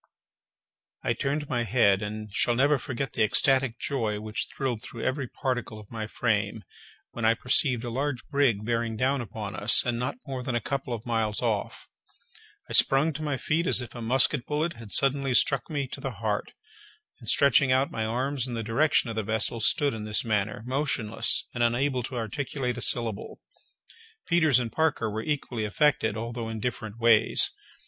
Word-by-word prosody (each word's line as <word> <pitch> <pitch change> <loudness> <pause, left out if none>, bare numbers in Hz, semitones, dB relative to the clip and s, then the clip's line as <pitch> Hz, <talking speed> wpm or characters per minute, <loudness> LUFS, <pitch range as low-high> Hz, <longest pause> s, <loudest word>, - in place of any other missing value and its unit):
I - - +1
turned 145 +2 -2
my 120 -3 0
head, 105 -3 +3
and 105 0 -6
shall 120 +3 +2
never 140 +3 +3
forget 130 0 -4
the - - -1
ecstatic 130 +3 +3
joy 115 -8 -2
which 110 +1 -3
thrilled 125 -5 -2
through 115 -2 -8
every 130 0 -1
particle 125 -4 -3
of 105 - -14
my 110 -2 -4
frame, 105 -2 -1 0.5
when 120 - -6
I 115 +1 +4
perceived 125 0 +2
a 120 - -4
large 135 +1 -2
brig 135 -8 +2
bearing 115 -1 -1
down 130 +3 +1
upon 105 -2 -6
us, 105 +2 +2
and 120 -1 -1
not 125 - -2
more 135 -2 -4
than 125 -1 -3
a - - +2
couple 135 +2 -3
of 115 -1 -4
miles 110 -3 -1
off. 110 -4 -2 0.8
I - - -7
sprung 145 +4 +5
to 155 - -6
my 145 -3 -1
feet 165 +6 0
as - - +4
if 120 -2 -6
a 120 - -7
musket 125 +3 +2
bullet 155 +3 -1
had 115 -7 -12
suddenly 135 -1 +2
struck 135 +1 +2
me 145 -4 -2
to 135 - -8
the 135 - -2
heart; 105 -1 -3 0.7
and, - - -8
stretching 140 -1 +4
out 130 +2 +2
my 110 - -2
arms 130 +3 -1
in 120 - -4
the 115 - -3
direction 125 +5 +2
of - - -6
the 110 - 0
vessel, 110 +2 0
stood 140 +5 +3
in 110 -1 -5
this 105 +1 -2
manner, 105 -1 -1
motionless, 130 -5 0
and 120 - -3
unable 125 +3 +1
to 125 +2 -6
articulate 125 +2 -3
a - - -7
syllable. 115 -4 -2 0.9
Peters 160 -6 +4
and 120 -3 -2
Parker 150 -9 0
were 110 +1 -3
equally 125 -4 -2
affected, 110 +1 +1
although 115 0 -4
in 110 -1 -5
different 110 -1 -4
ways. 115 -2 +4
120 Hz, 185 wpm, -27 LUFS, 110-135 Hz, 0.9 s, sprung